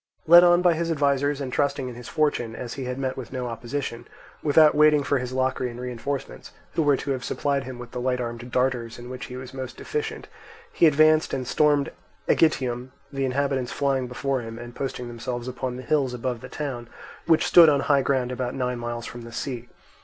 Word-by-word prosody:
Led 170 Hz, +2 st, +9 dB
on 175 Hz, 0 st, +5 dB
by 175 Hz, -2 st, +5 dB
his 165 Hz, +1 st, -2 dB
advisers 145 Hz, -2 st, +1 dB
and 130 Hz, -3 st, -4 dB
trusting 140 Hz, -2 st, 0 dB
in 125 Hz, -, -6 dB
his 120 Hz, 0 st, -10 dB
fortune, 145 Hz, -7 st, 0 dB
as 120 Hz, 0 st, -6 dB
he 135 Hz, -2 st, -5 dB
had 125 Hz, 0 st, -4 dB
met 130 Hz, -1 st, -2 dB
with 130 Hz, -3 st, -8 dB
no 125 Hz, -1 st, -3 dB
opposition, 120 Hz, +1 st, -5 dB, 0.3 s
without 150 Hz, 0 st, +5 dB
waiting 150 Hz, -1 st, +5 dB
for 140 Hz, -1 st, +1 dB
his 125 Hz, 0 st, -4 dB
Locrian 130 Hz, -2 st, -1 dB
reinforcements, 125 Hz, +2 st, -5 dB, 0.2 s
who -, -, +1 dB
were 145 Hz, -3 st, +3 dB
to 140 Hz, -, -3 dB
have 130 Hz, -2 st, -2 dB
supplied 140 Hz, -2 st, -1 dB
him 130 Hz, -1 st, -7 dB
with 120 Hz, -1 st, -9 dB
the 125 Hz, -, -4 dB
light 125 Hz, 0 st, 0 dB
armed 120 Hz, 0 st, -5 dB
darters 125 Hz, -3 st, 0 dB
in 120 Hz, +1 st, -9 dB
which 130 Hz, 0 st, -6 dB
he 125 Hz, -, -8 dB
was 130 Hz, 0 st, -9 dB
most 130 Hz, -1 st, -6 dB
deficient, 440 Hz, 0 st, -4 dB, 0.5 s
he 165 Hz, -, +5 dB
advanced 155 Hz, +1 st, +4 dB
and 130 Hz, -2 st, -4 dB
stormed 145 Hz, -1 st, +2 dB, 0.4 s
Aegitium, 130 Hz, -6 st, +2 dB, 0.2 s
the 135 Hz, 0 st, -1 dB
inhabitants 130 Hz, -1 st, -1 dB
flying 135 Hz, -2 st, 0 dB
before 130 Hz, +1 st, -2 dB
him 115 Hz, 0 st, -8 dB
and 120 Hz, 0 st, -9 dB
posting 125 Hz, -2 st, -4 dB
themselves 120 Hz, +1 st, -5 dB
upon 125 Hz, 0 st, -4 dB
the 130 Hz, -, -7 dB
hills 135 Hz, -3 st, +1 dB
above 120 Hz, -1 st, -3 dB
the -, -, -9 dB
town, 130 Hz, -6 st, -5 dB, 0.4 s
which 160 Hz, -1 st, +4 dB
stood 170 Hz, -2 st, +8 dB
on 140 Hz, -2 st, +2 dB
high 140 Hz, -1 st, +3 dB
ground 130 Hz, -2 st, 0 dB
about 125 Hz, -1 st, -3 dB
nine 125 Hz, -2 st, -2 dB
miles 120 Hz, 0 st, -4 dB
from 120 Hz, -, -8 dB
the 115 Hz, 0 st, -10 dB
sea. 120 Hz, -1 st, -5 dB
130 Hz, 210 wpm, -25 LUFS, 125-145 Hz, 0.5 s, Led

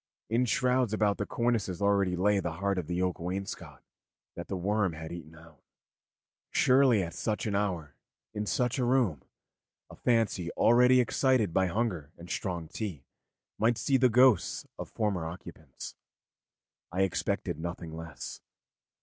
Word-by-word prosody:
In 120 Hz, +3 st, +3 dB
shrouds 125 Hz, -1 st, +1 dB
about 105 Hz, -2 st, +1 dB
the 100 Hz, -, -2 dB
cornices 115 Hz, -7 st, 0 dB
already 100 Hz, -2 st, +2 dB
lay 100 Hz, +3 st, +2 dB
the 85 Hz, -3 st, -3 dB
heart 100 Hz, +2 st, -1 dB
of 85 Hz, -, -5 dB
the 90 Hz, +1 st, -1 dB
oak 90 Hz, -1 st, -1 dB
wainscot 95 Hz, +3 st, -5 dB, 0.5 s
that 85 Hz, -, -7 dB
the 95 Hz, -, -3 dB
worm 100 Hz, 0 st, 0 dB
had 80 Hz, +1 st, -7 dB
eaten 80 Hz, -2 st, -9 dB
out. 80 Hz, -1 st, -17 dB, 0.9 s
Surely 125 Hz, -5 st, +4 dB
at 85 Hz, -, -6 dB
such 105 Hz, -1 st, -2 dB
an 105 Hz, -, -1 dB
hour, 90 Hz, -8 st, -1 dB, 0.4 s
in 105 Hz, -1 st, -3 dB
such 125 Hz, +4 st, 0 dB
a -, -, +1 dB
room, 120 Hz, -, +2 dB, 0.7 s
a -, -, -10 dB
fancy 110 Hz, -7 st, +1 dB
already 125 Hz, +2 st, +5 dB
excited 125 Hz, -6 st, +2 dB
by 95 Hz, +1 st, +3 dB
hunger 90 Hz, -7 st, -2 dB
and 85 Hz, +1 st, -10 dB
strong 85 Hz, -4 st, -3 dB
tea 85 Hz, -7 st, -6 dB, 0.5 s
might 115 Hz, +1 st, +3 dB
see 135 Hz, -, +2 dB
the 130 Hz, 0 st, +4 dB
ghosts 120 Hz, -6 st, +4 dB
of -, -, -6 dB
former 100 Hz, -6 st, -1 dB
occupants. 80 Hz, -4 st, -9 dB, 1.0 s
I 95 Hz, +2 st, +1 dB
expected 95 Hz, -4 st, -1 dB
nothing 85 Hz, -1 st, -5 dB
less. 80 Hz, -2 st, -8 dB
100 Hz, 150 wpm, -30 LUFS, 85-115 Hz, 1.0 s, already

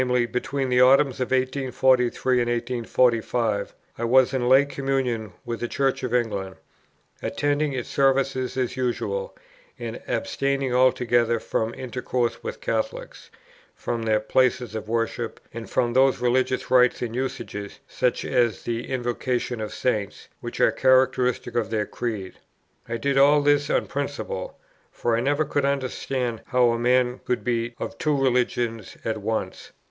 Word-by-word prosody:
between 130 Hz, +2 st, -2 dB
the 125 Hz, 0 st, +4 dB
autumns 135 Hz, +1 st, +5 dB
of 125 Hz, -, -1 dB
1843 130 Hz, -1 st, +2 dB
and 120 Hz, -, 0 dB
1845, 120 Hz, -3 st, 0 dB, 0.2 s
I -, -, -2 dB
was 130 Hz, +2 st, +4 dB
in 125 Hz, -2 st, 0 dB
lay 135 Hz, +2 st, +6 dB
communion 135 Hz, -6 st, -2 dB
with 120 Hz, -1 st, -4 dB
the 120 Hz, -, -2 dB
Church 135 Hz, +1 st, 0 dB
of 125 Hz, -, -3 dB
England, 100 Hz, -6 st, -1 dB, 0.7 s
attending 145 Hz, 0 st, 0 dB
its 125 Hz, -2 st, -4 dB
services 135 Hz, -1 st, +1 dB
as 130 Hz, -2 st, -1 dB
usual, 130 Hz, -, -2 dB, 0.4 s
and -, -, -6 dB
abstaining 140 Hz, -, -1 dB
altogether 120 Hz, -2 st, +3 dB
from 110 Hz, 0 st, -2 dB
intercourse 125 Hz, -1 st, -2 dB
with 475 Hz, +1 st, -6 dB
Catholics, -, -, -3 dB, 0.5 s
from 115 Hz, -, -3 dB
their 110 Hz, -1 st, +2 dB
places 125 Hz, +1 st, +1 dB
of 110 Hz, -1 st, -5 dB
worship, 115 Hz, 0 st, -2 dB
and 115 Hz, -1 st, -7 dB
from 120 Hz, -2 st, +1 dB
those 130 Hz, 0 st, +4 dB
religious 130 Hz, +1 st, 0 dB
rites 125 Hz, -1 st, +4 dB
and 115 Hz, -2 st, -4 dB
usages, 105 Hz, -5 st, -4 dB
such -, -, -1 dB
as 120 Hz, -2 st, +1 dB
the 120 Hz, 0 st, -3 dB
Invocation 120 Hz, -1 st, -2 dB
of 105 Hz, -, -4 dB
Saints, 105 Hz, -6 st, -2 dB
which -, -, -7 dB
are -, -, +5 dB
characteristics 130 Hz, -2 st, +2 dB
of 115 Hz, -4 st, 0 dB
their 110 Hz, -2 st, 0 dB
creed. 110 Hz, -6 st, -5 dB, 0.5 s
I 120 Hz, -, -2 dB
did 135 Hz, +4 st, +1 dB
all 145 Hz, +1 st, +5 dB
this 145 Hz, 0 st, +3 dB
on -, -, +1 dB
principle; 140 Hz, -9 st, -4 dB, 0.3 s
for 120 Hz, -1 st, 0 dB
I -, -, +1 dB
never 145 Hz, +5 st, +1 dB
could 145 Hz, 0 st, -1 dB
understand 130 Hz, -3 st, -2 dB
how 125 Hz, -2 st, +3 dB
a 115 Hz, -, -1 dB
man 125 Hz, +1 st, +2 dB
could 125 Hz, -, -1 dB
be 120 Hz, -1 st, -1 dB
of 115 Hz, -, -6 dB
two 150 Hz, -2 st, +1 dB
religions 120 Hz, -4 st, 0 dB
at 110 Hz, -1 st, -1 dB
once. 110 Hz, +2 st, -4 dB
125 Hz, 150 wpm, -24 LUFS, 115-135 Hz, 0.7 s, lay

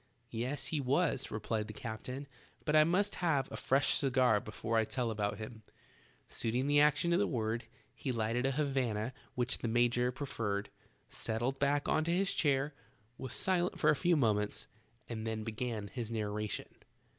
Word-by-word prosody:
"Yes, 125 Hz, +5 st, -2 dB
he 150 Hz, -, +1 dB
was," 140 Hz, +1 st, +1 dB
replied 105 Hz, 0 st, -2 dB
the 110 Hz, -, -8 dB
captain, 125 Hz, +5 st, -5 dB, 0.4 s
"but 150 Hz, 0 st, +2 dB
I 155 Hz, -, +8 dB
must 185 Hz, +6 st, +2 dB
have 145 Hz, -6 st, +2 dB
a -, -, -4 dB
fresh 135 Hz, +1 st, +3 dB
cigar 130 Hz, -5 st, +3 dB
before 110 Hz, +2 st, -3 dB
I 110 Hz, -, +5 dB
tell 120 Hz, +1 st, -1 dB
about 105 Hz, -1 st, -1 dB
him." 110 Hz, +1 st, -7 dB, 0.7 s
Suit 115 Hz, 0 st, -2 dB
ing 130 Hz, +2 st, +2 dB
the 145 Hz, +1 st, +4 dB
action 150 Hz, +3 st, +3 dB
to 170 Hz, -, +4 dB
the 205 Hz, -, +2 dB
word, 115 Hz, -2 st, -1 dB, 0.3 s
he 135 Hz, -, -3 dB
lighted 115 Hz, +2 st, 0 dB
a -, -, +1 dB
Havana 130 Hz, -5 st, 0 dB, 0.2 s
which 125 Hz, 0 st, +1 dB
the -, -, -2 dB
major 120 Hz, +1 st, +3 dB
proffered, 110 Hz, -7 st, -3 dB, 0.4 s
settled 120 Hz, +5 st, -2 dB
back 145 Hz, +1 st, +2 dB
into 155 Hz, +1 st, +2 dB
his 185 Hz, +2 st, +2 dB
chair, 145 Hz, -1 st, +1 dB, 0.5 s
was 130 Hz, -2 st, -5 dB
silent 180 Hz, -1 st, +1 dB
for 150 Hz, -, +5 dB
a -, -, +3 dB
few 175 Hz, +3 st, +3 dB
moments, 105 Hz, -5 st, +1 dB, 0.4 s
and 115 Hz, -1 st, -4 dB
then 110 Hz, -1 st, -2 dB
began 110 Hz, -1 st, -3 dB
his 115 Hz, +1 st, -5 dB
narration. 105 Hz, -2 st, -2 dB
125 Hz, 170 wpm, -34 LUFS, 110-145 Hz, 0.7 s, I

